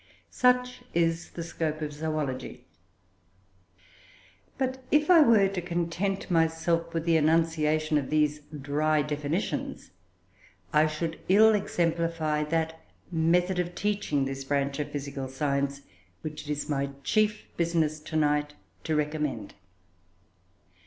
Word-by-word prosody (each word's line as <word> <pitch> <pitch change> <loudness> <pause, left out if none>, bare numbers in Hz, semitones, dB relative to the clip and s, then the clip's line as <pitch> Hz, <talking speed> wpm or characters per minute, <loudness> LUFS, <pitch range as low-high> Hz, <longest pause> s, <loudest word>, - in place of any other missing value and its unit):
Such 250 0 +2
is 165 0 +1
the 170 - -6
scope 160 -2 -3
of 150 -1 -4
zoology. 150 -4 -4 1.9
But 260 0 -2
if 300 +3 +3
I 340 -3 +8
were 225 -8 +6
to 190 -2 -3
content 175 +3 -2
myself 165 0 +1
with 165 -1 -2
the 165 -1 +4
enunciation 155 -1 +2
of 135 - -5
these 150 -1 +2
dry 150 +1 0
definitions, 150 +5 -3 0.8
I 155 +1 +5
should 160 +2 -3
ill 220 +3 +7
exemplify 165 -5 0
that 160 +1 -1 0.3
method 175 +3 +2
of 175 0 -2
teaching 200 -9 0
this 135 0 -4
branch 140 0 -1
of 150 - -2
physical 140 -2 -5
science, 140 +1 -1 0.4
which 155 -1 -6
it - - 0
is 145 0 -3
my 140 -2 -1
chief 215 +6 +1
business 165 -2 0
to 160 +1 -8
night 150 -1 +1 0.3
to 160 - 0
recommend. 150 -7 -2
160 Hz, 125 wpm, -28 LUFS, 150-175 Hz, 1.9 s, I